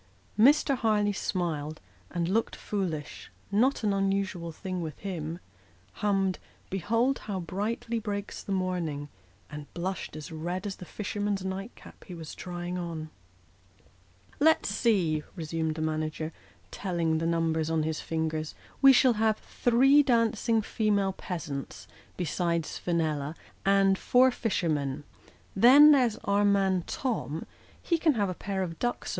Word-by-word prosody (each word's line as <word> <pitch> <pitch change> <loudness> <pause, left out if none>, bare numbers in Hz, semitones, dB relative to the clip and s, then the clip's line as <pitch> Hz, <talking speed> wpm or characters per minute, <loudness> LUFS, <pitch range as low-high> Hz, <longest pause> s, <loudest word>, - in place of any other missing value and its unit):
Mr. 275 +3 +5
Harleigh 210 -3 +2
smiled, 155 -6 -2 0.3
and 170 -1 -1
looked 220 +5 0
foolish 175 -8 -4 0.2
not 235 +6 +2
an 205 -2 +2
unusual 195 -3 -1
thing 185 +2 -5
with 155 -3 -5
him 170 -4 -4 0.6
hummed 195 -2 +1 0.2
" - - -32
Behold 230 +8 +1
how 200 -3 -4
brightly 210 +6 -2
breaks 205 -2 -4
the - - -7
morning," 175 -6 -2 0.4
and 150 -1 -8
blushed 185 0 -4
as 155 +1 -8
red 175 +5 -4
as 200 -2 -4
the 180 - -9
fisherman's 205 0 -3
night 195 +4 -5
cap - - -15
he 180 - -8
was 160 -2 -8
trying 175 0 -5
on. 160 -3 -5 0.7
" 90 +1 -30
Let's 315 -4 +4
see," 195 -8 +2
resumed 160 -2 -2
the 155 - -3
manager, 155 0 -2 0.4
telling 170 -4 -1
the 165 - -1
number 165 -1 +1
on 160 -1 +1
his 155 0 -2
fingers, 160 -1 -2
" - - -27
we 275 -1 +9
shall 255 0 +5
have 220 -1 +3
three 265 +4 +4
dancing 230 -3 +2
female 205 -3 +1
peasants, 150 -8 -6 0.3
besides 170 -1 -1
Fenella, 155 -3 -1 0.3
and 195 -1 +4
four 255 +1 +5
fishermen. 155 - -1 0.5
Then, 270 +9 +8
there's 250 -6 +4
our 200 +1 +2
man 195 -3 +2
Tom; 215 - -3 0.3
he 335 -2 0
can 310 -4 +3
have 205 -3 +1
a - - -2
pair 190 +1 -3
of 165 -3 -6
ducks 240 0 -2
185 Hz, 145 wpm, -28 LUFS, 160-210 Hz, 0.7 s, we